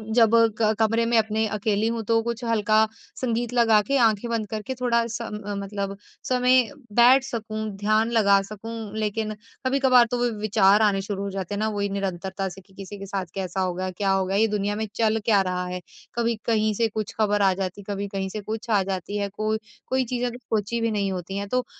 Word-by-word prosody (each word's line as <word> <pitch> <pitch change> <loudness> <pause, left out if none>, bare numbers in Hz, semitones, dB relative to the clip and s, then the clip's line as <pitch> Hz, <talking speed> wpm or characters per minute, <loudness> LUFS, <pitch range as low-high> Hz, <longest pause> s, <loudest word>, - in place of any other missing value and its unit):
जब 230 -2 +5 0.3
क 215 0 +4
कमरे 225 +1 +2
में 235 0 +2
अपने 220 0 +1
अकेली 210 +1 0
हूँ 230 0 -1
तो 225 0 +3
कुछ 235 +1 -4
हल्का 220 -1 +3 0.3
संगीत 240 -1 -1
लगा 225 -3 +5
के, 275 +5 +1
आँखें 225 -2 +2
बंद 220 -2 -1
करके 220 +4 -4
थोड़ा-सा 235 -2 -1
म 205 -1 -5
मतलब 200 0 -4 0.3
समय 255 0 +4 0.3
बैठ 245 +4 +6
सकूँ, 220 -4 -4 0.2
ध्यान 215 +3 +2
लगा 200 -4 +4
सकूँ। 215 +1 -7
लेकिन 215 0 -1 0.3
कभी-कभार 260 -2 +5
तो 245 - 0
व 245 - +2
विचार 210 -1 +4
आने 200 -2 +3
शुरू 200 0 -4
हो 200 - -3
जाते 195 +1 -4
हैं - - -3
ना, 215 - +1
वो 205 -1 -4
ही 200 0 0
निरंतरता 195 0 -3
से 190 +2 -11
कि 195 +1 -25
किसी 195 +1 -8
के 195 - -6
साथ 195 -1 -3
कैसा 190 -1 -2
होगा, 185 0 -1
क्या 195 +2 0
होगा? 195 0 +1
ये 220 +2 +4
दुनिया 205 -1 -1
में 220 0 -3
चल 225 -1 +2
क्या 210 -4 +4
रहा 180 -1 -2
है, 180 0 -5 0.3
कभी 235 0 +1
कहीं 215 -2 +2
से 230 +2 +2
कुछ 215 -1 -4
ख़बर 205 -1 +2
आ 195 -1 +4
जाती 190 +1 -4
है, 205 +1 -5
कभी 200 +1 -3
कहीं 195 -1 -3
से 210 +2 -5
कुछ 220 +3 -6
आ 205 -3 +4
जाती 190 +1 -3
है। 200 -1 -1
कोई 215 +1 -1 0.3
कोई 260 0 +1
चीज़ें 245 +1 -1
अगर 240 0 -5
सोच 215 -2 -3
भी 230 - +1
नहीं 200 -2 0
होती 185 +2 -5
है, 200 - -3
तो 250 +4 0
215 Hz, 220 wpm, -24 LUFS, 195-230 Hz, 0.3 s, बैठ